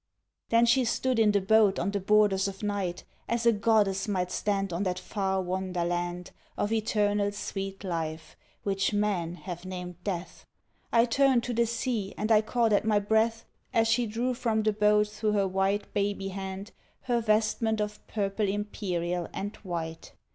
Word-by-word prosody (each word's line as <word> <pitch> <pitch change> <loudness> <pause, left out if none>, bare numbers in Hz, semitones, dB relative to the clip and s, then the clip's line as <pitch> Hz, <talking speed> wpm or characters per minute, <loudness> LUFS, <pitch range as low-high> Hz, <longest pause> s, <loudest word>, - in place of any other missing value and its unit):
Then 230 +1 +5
she 240 +2 +4
stood 250 +1 0
in 215 -2 +5
the 205 - +3
boat 205 0 +4
on 200 - -1
the 200 - -1
borders 200 -1 +3
of 195 +1 -7
night 200 -4 -2 0.3
As 235 0 0
a 235 - +7
goddess 205 -2 +2
might 180 -3 -1
stand 195 -2 -1
on 170 - -2
that 185 -2 -1
far 190 0 -1
wonder 180 -1 -2
land 175 0 -3 0.3
Of 205 - -1
eternal 210 -2 +1
sweet 195 -1 -5
life, 160 -3 -4 0.3
which 195 0 0
men 190 -5 0
have 175 -1 -7
named 180 -1 -7
Death. 185 -3 -5 0.4
I 230 0 +5
turned 260 0 +3
to 245 - -3
the 235 0 +2
sea 230 -3 -2
and 215 +2 -1
I 215 -1 +6
caught 225 0 +1
at 205 - +3
my 215 -1 +2
breath, 220 +2 +1 0.3
As 225 0 +4
she 230 +1 +2
drew 235 +4 -1
from 230 -3 0
the 215 0 +2
boat 210 0 +3
through 210 0 -1
her 200 -2 +2
white 195 +2 -1
baby 200 -1 -1
hand 195 +2 -6 0.3
Her 240 -2 0
vestment 220 0 +1
of 210 0 -3
purple 205 0 -1
imperial, 180 -4 -2
and 205 +2 -4
white. 165 -4 -6
205 Hz, 175 wpm, -28 LUFS, 190-220 Hz, 0.4 s, a